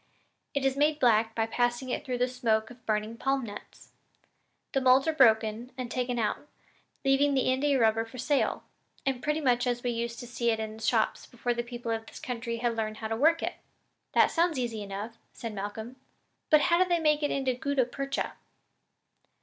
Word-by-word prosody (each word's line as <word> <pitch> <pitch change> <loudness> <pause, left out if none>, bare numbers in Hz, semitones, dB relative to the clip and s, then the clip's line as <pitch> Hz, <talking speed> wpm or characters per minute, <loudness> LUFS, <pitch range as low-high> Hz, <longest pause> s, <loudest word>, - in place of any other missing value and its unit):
It 280 -1 0
is 270 0 +2
made 295 +2 +2
black 225 -3 +3
by 225 - +1
passing 245 +2 -1
it - - -2
through 255 -3 -2
the 250 +1 +2
smoke 230 -3 0
of 245 0 -15
burning 215 +1 -1
palm 270 +2 0
nuts. 205 -3 -10 0.8
The 270 - +2
moulds 260 +3 +5
are 320 - +2
broken 225 -2 +3
and 250 -2 -5
taken 245 -1 -1
out, 230 +5 -1 0.6
leaving 275 +1 +3
the 260 -1 +3
India 275 +1 +2
rubber 225 -1 +3
ready 225 - -6
for 255 - -10
sale, 275 +3 0 0.4
and 265 -2 0
pretty 300 +2 0
much 250 -3 +2
as 245 0 -1
we 245 - 0
used 235 0 -3
to - - -7
see 235 0 -1
it 225 -1 +1
in 220 0 -4
the - - -12
shops 220 0 +1
before 245 0 -2
the 240 - -1
people 240 -1 -5
of 225 0 -3
this - - -10
country 235 -1 -4
had 235 0 0
learned 215 -1 -2
how 220 -1 -5
to 225 - 0
work 320 +7 +3
it.'" - - -3 0.6
"That - - +5
seems 335 -2 +2
easy 235 -4 -2
enough," 205 +3 -6
said 230 -3 -6
Malcolm, 220 +5 -6 0.5
"but 305 -1 +6
how 340 +3 +3
do 370 - +3
they 345 - +3
make 305 -1 +2
it 290 - +1
into 265 -2 0
gutta 265 +1 0
percha?" 275 +3 -3
245 Hz, 205 wpm, -29 LUFS, 225-270 Hz, 0.8 s, but